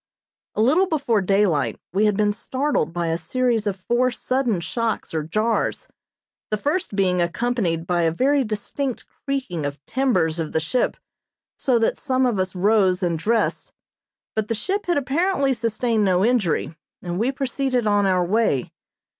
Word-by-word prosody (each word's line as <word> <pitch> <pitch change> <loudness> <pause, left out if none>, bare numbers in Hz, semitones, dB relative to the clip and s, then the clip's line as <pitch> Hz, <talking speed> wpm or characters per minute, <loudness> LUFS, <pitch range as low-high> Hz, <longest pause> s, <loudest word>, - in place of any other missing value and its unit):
A 215 - +2
little 325 +11 +4
before 275 - +1
daylight 190 -6 +1
we 205 +3 +3
had 210 -2 +2
been 210 -1 +3
startled 260 - -1
by 170 0 -2
a 165 +1 -1
series 230 +4 0
of 200 - 0
four 240 +6 +1
sudden 250 -4 -1
shocks 230 +4 -2
or 160 - 0
jars, 215 +9 -1 0.6
the 215 - 0
first 295 - -2
being 185 -3 +2
accompanied 175 -3 -1
by 175 0 +1
a 165 -1 +2
very 275 - +2
distinct 230 +4 -3
creaking 260 - -4
of 145 0 -4
timbers 185 -11 +1
of 160 -2 -3
the 160 - +2
ship, 160 +11 0 0.6
so 255 -3 +1
that 225 - +1
some 260 -2 +1
of 235 -6 0
us 185 0 -1
rose 190 -1 +3
and 170 -2 0
dressed; 225 +6 0 0.6
but 220 -1 0
the 230 - -1
ship 390 - -2
had 345 - +2
apparently 280 +1 +1
sustained 230 -1 0
no 185 0 +3
injury, 205 -9 +1 0.3
and 175 +1 -3
we 240 +5 +1
proceeded 265 -2 -1
on 205 -1 +3
our 180 -2 +2
way. 190 - +1
215 Hz, 165 wpm, -22 LUFS, 180-255 Hz, 0.6 s, little